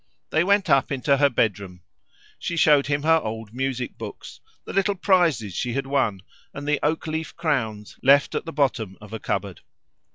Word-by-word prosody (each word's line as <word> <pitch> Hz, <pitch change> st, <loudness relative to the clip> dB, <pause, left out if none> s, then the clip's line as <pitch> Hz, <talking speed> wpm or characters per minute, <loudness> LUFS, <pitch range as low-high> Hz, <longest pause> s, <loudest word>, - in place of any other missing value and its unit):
They 160 Hz, -, +3 dB
went 200 Hz, +1 st, +2 dB
up 135 Hz, +1 st, +3 dB
into 140 Hz, +1 st, +2 dB
her 140 Hz, 0 st, +4 dB
bedroom. 100 Hz, -7 st, -2 dB, 0.6 s
She 170 Hz, -, -3 dB
showed 150 Hz, -3 st, +5 dB
him 145 Hz, 0 st, 0 dB
her 160 Hz, +1 st, +5 dB
old 110 Hz, -4 st, -6 dB
music 130 Hz, -1 st, -3 dB
books, -, -, -9 dB, 0.3 s
the -, -, -7 dB
little 195 Hz, +1 st, +1 dB
prizes 170 Hz, -, +2 dB
she 120 Hz, -, -2 dB
had 135 Hz, +2 st, -2 dB
won, 120 Hz, -9 st, 0 dB, 0.3 s
and 140 Hz, +1 st, -6 dB
the 150 Hz, -1 st, +1 dB
oak 155 Hz, +2 st, 0 dB
leaf 160 Hz, 0 st, -4 dB
crowns, 115 Hz, -11 st, -2 dB
left 140 Hz, +2 st, +4 dB
at -, -, -2 dB
the 165 Hz, -, -5 dB
bottom 125 Hz, -, -1 dB
of 105 Hz, +1 st, -12 dB
a 110 Hz, -, -4 dB
cupboard. 100 Hz, -2 st, -3 dB
140 Hz, 185 wpm, -24 LUFS, 110-155 Hz, 0.6 s, showed